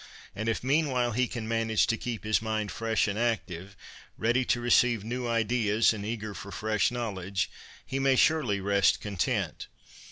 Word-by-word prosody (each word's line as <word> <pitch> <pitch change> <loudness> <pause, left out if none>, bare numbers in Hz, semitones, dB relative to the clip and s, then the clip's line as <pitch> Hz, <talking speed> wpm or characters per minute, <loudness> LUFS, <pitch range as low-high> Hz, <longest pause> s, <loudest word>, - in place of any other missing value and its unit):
And 110 +2 -2
if 115 - -1
meanwhile 130 -3 +1
he 125 +2 +1
can 115 -2 -5
manage 115 -1 +2
to 115 - +1
keep 115 -1 -5
his 110 0 +1
mind 110 -2 -2
fresh 115 -2 0
and 105 +1 -2
active, 95 -5 -2 0.4
ready 120 +3 +2
to 120 - +1
receive 120 -2 +3
new 120 +2 -3
ideas 115 -1 +2
and 105 -2 -6
eager 110 -1 -4
for 95 +2 -8
fresh 110 0 +1
knowledge, 100 -6 -3 0.3
he 135 - -3
may 135 -1 +3
surely 130 -9 +3
rest 100 0 +3
content. 100 -4 -2
110 Hz, 165 wpm, -28 LUFS, 105-120 Hz, 0.4 s, receive